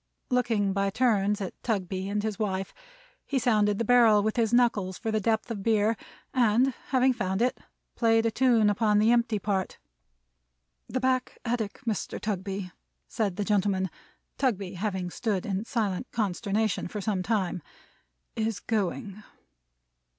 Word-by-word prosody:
Looking 225 -6 +1
by 195 0 +1
turns 210 -3 +1
at 190 - -6
Tugby 190 -3 -2
and 205 0 -1
his 215 -3 -3
wife, 195 -3 -2 0.5
he 280 - 0
sounded 210 -5 +2
the 230 - -1
barrel 225 -3 +5
with 220 0 0
his 230 -3 +1
knuckles 225 -6 +2
for 225 - -3
the 215 - +1
depth 220 +2 0
of 210 -3 -4
beer, 220 +1 +2 0.4
and 245 +2 +3
having 260 0 +3
found 190 -5 -2
it, 250 +2 +1 0.3
played 225 -1 +3
a 230 - +2
tune 235 -3 +3
upon 210 0 +2
the 215 +2 +4
empty 235 -2 +2
part. 195 -2 -2 1.1
"The 255 - -1
back 255 0 0
attic, 230 -2 -2
Mr. 220 -4 -2
Tugby," 195 -2 -3 0.4
said 210 -6 -1
the 205 +1 -2
gentleman: 195 -3 +1 0.5
Tugby 205 -8 0
having 185 -2 -3
stood 205 -4 -2
in 195 +1 -2
silent 220 -1 -2
consternation 210 0 -1
for 210 - -5
some 200 -1 -1
time; 185 -4 -1 0.7
"is 220 -1 -1
Going." 205 -1 -2
215 Hz, 150 wpm, -27 LUFS, 195-230 Hz, 1.1 s, barrel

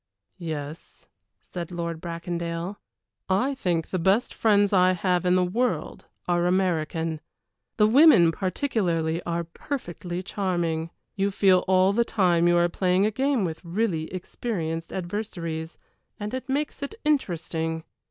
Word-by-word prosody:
"Yes," 155 -2 -7 0.4
said 175 -2 -6
Lord 170 -2 -4
Bracondale. 170 +2 -4 0.5
"I 205 +9 +2
think 175 - -1
the 185 - -1
best 195 +7 +2
friends 205 -2 +3
I 185 -1 +5
have 180 0 0
in 180 0 +4
the 185 - +3
world 240 +8 -2 0.2
are 175 0 +2
American. 165 -3 0 0.6
The 210 - +5
women 225 - +7
particularly 175 - -1
are 170 0 -1
perfectly 175 - -5
charming. 175 -5 -1 0.2
You 195 0 0
feel 190 -2 +4
all 190 +1 +4
the 235 +3 +3
time 175 -6 +2
you 175 0 +4
are 175 0 +4
playing 185 +2 +2
a 215 - +1
game 265 -2 +1
with 160 0 -5
really 170 -3 -1
experienced 175 -3 -4
adversaries, 175 -4 -4 0.4
and 210 +2 -4
it 260 +1 -5
makes 290 +2 -2
it 280 +8 -5
interesting. 165 - -1
180 Hz, 135 wpm, -26 LUFS, 170-205 Hz, 0.6 s, women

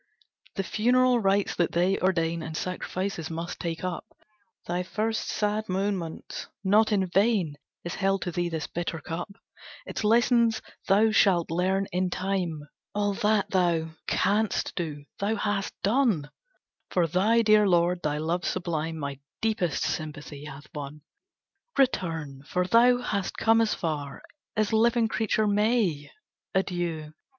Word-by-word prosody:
"The 195 - -1
funeral 250 +4 +3
rites 200 -1 +1
that 175 - +1
they 180 +3 +2
ordain 170 -3 +1
And 160 0 -5
sacrifices 185 -2 -3
must 165 +1 -5
take 165 -1 -4
up 185 -1 -3 0.6
Thy 175 +1 -1
first 215 +4 -2
sad 210 0 -1
moments; 185 -3 -3 0.2
not 210 +3 +4
in 195 -2 +2
vain 190 -4 +2 0.3
Is 175 - -4
held 195 0 0
to 175 - -3
thee 175 +1 -1
this 160 -2 -3
bitter 170 -1 -4
cup; 165 +5 -5 0.6
Its - - -4
lessons 235 +1 +4 0.3
thou 210 +3 +4
shall 185 -6 +4
learn 190 +3 +1
in 180 +1 0
time! 185 -4 -2 0.3
All 205 -1 +1
that 205 0 +1
thou 170 -3 +2 0.2
canst 210 +1 +1
do, 150 -5 -4
thou 205 +3 0
hast 205 -2 -2
done 205 - +2 0.6
For 175 -2 +2
thy 210 +8 +3
dear 215 -1 +5
lord. 175 0 +3
Thy 150 -2 -1
love 165 +4 -1
sublime 165 -3 -2
My 140 -2 -5 0.2
deepest 210 -8 0
sympathy 150 -2 -4
hath 145 0 -9
won. 145 0 -7 0.8
Return, 165 - 0
for 180 0 0
thou 245 +5 +5
hast 200 -5 -2
come 225 0 +4
as 225 - +1
far 145 -4 -4 0.3
As 215 0 +1
living 230 +1 +4
creature 220 0 +1
may. 205 -8 +1 0.5
Adieu! 175 -5 -1
185 Hz, 140 wpm, -27 LUFS, 165-210 Hz, 0.8 s, dear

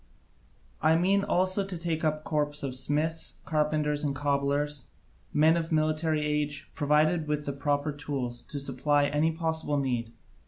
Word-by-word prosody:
I 160 +1 +4
mean 195 +4 +3
also 185 +1 +1
to 190 -2 -5
take 165 -1 -2
a 155 -1 +1
corps 150 -1 -1
of 130 -2 -3
smiths, 150 +5 0
carpenters, 150 -1 0
and 140 -2 -1
cobblers, 140 0 -1 0.4
men 155 +2 +4
of 165 -1 -2
military 155 0 +1
age, 150 0 -2
provided 155 +2 +2
with 150 0 -1
the 140 - -2
proper 145 +1 0
tools, 135 -4 -4
to 145 - -4
supply 140 +2 +2
any 150 +3 +2
possible 160 -2 -1
need. 120 -4 -1
150 Hz, 150 wpm, -28 LUFS, 145-160 Hz, 0.4 s, I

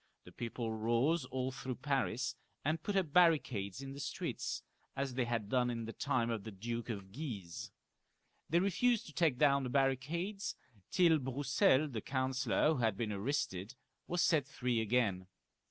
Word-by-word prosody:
The - - -13
people 115 -1 -4
rose 120 +8 +2
all 130 0 -2
through 130 -1 -5
Paris, 130 -5 -1 0.3
and 155 +2 +1
put 205 +4 -2
up 175 -7 +1
bar 180 -1 +8
ricades 115 - -3
in 135 0 -6
the 140 - -8
streets, 140 - -3 0.3
as 135 -1 -2
they 125 -1 0
had 115 -3 -1
done 125 +2 +2
in 115 -1 -3
the 115 - -6
time 130 -5 0
of 110 -3 -2
the 110 - -6
Duke 115 +4 -4
of 100 -4 -5
Guise. 105 - -6 0.8
They 170 - +3
refused 210 +5 +2
to 155 - -11
take 160 -7 +2
down 140 -1 +4
the 125 - -2
barricades, 145 +10 0 0.3
till 170 -3 +5
Broussel, 135 +4 +3
the 120 -6 -4
counsellor 130 +1 +1
who - - -2
had 110 -4 +1
been 110 -3 -1
arrested, 100 -1 -2 0.3
was 175 0 +1
set 150 -5 +3
free 125 -5 0
again. 105 -5 +1
130 Hz, 170 wpm, -35 LUFS, 115-145 Hz, 0.8 s, bar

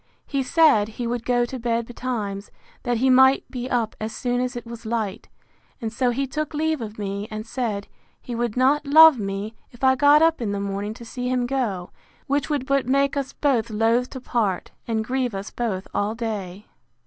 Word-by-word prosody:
He 275 -2 -1
said, 265 -6 +4
He 245 - -2
would 235 0 -2
go 245 -1 +3
to 255 +1 -6
bed 230 0 0
betimes, 220 -5 -4 0.3
that 245 -2 0
he 260 +3 +3
might 265 +1 +5
be 250 -1 -4
up 235 -4 0
as 220 +1 -4
soon 245 0 -1
as 250 0 -2
it 240 - -6
was 235 0 -9
light; 220 -3 -3 0.5
and 225 -3 -4
so 250 +1 +1
he 265 +3 0
took 300 +3 -4
leave 315 -2 0
of 215 -1 -6
me, 200 0 -4
and 215 0 -6
said, 225 -4 -3 0.3
He 245 - -7
would 235 -1 -2
not 275 +4 +3
love 315 -2 +8
me, 200 +2 -4 0.2
if 240 +2 -17
I 260 0 +6
got 290 +3 +5
up 325 -4 +3
in 205 -3 -1
the 200 - -2
morning 200 +2 -3
to 235 - -11
see 250 +2 -4
him 250 -1 +1
go; 235 -9 -2 0.3
which 285 +1 0
would 290 -4 -1
but 275 -2 +1
make 275 +2 +2
us 275 -2 -2
both 250 -6 +1
loath 225 +3 +1
to 260 - -7
part, 220 -7 -1 0.2
and 220 -1 -1
grieve 250 -2 -1
us 195 +1 -5
both 205 -6 -3
all 205 +2 -1
day. 210 -4 -5
240 Hz, 205 wpm, -23 LUFS, 215-265 Hz, 0.5 s, love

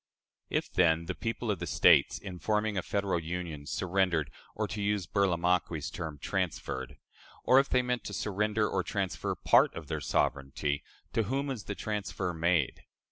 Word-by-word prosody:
If, - - -1
then, 85 -2 +3
the 95 - -2
people 115 +2 -2
of 100 - -2
the 90 - -4
States, - - +5
in 95 -3 -8
forming 105 +1 0
a 95 - +1
Federal 100 -2 0
Union, 80 -3 -5
surrendered 90 -5 0 0.2
or, 110 0 -1
to 105 0 -4
use 100 -2 0
Burlamaqui's 90 -4 +1
term, 80 -4 -5
transferred 65 -2 -3 0.5
or 130 - +6
if 135 - +1
they 125 0 +3
meant 125 -1 -1
to - - -5
surrender 105 +1 0
or 95 - 0
transfer 95 +1 -2
part - - +4
of - - -8
their - - -2
sovereignty, 70 +1 0 0.3
to 115 - +1
whom 135 +6 -1
was 130 -7 -4
the 100 - -4
transfer 100 -4 -3
made? 85 -3 +1
95 Hz, 170 wpm, -30 LUFS, 85-105 Hz, 0.5 s, or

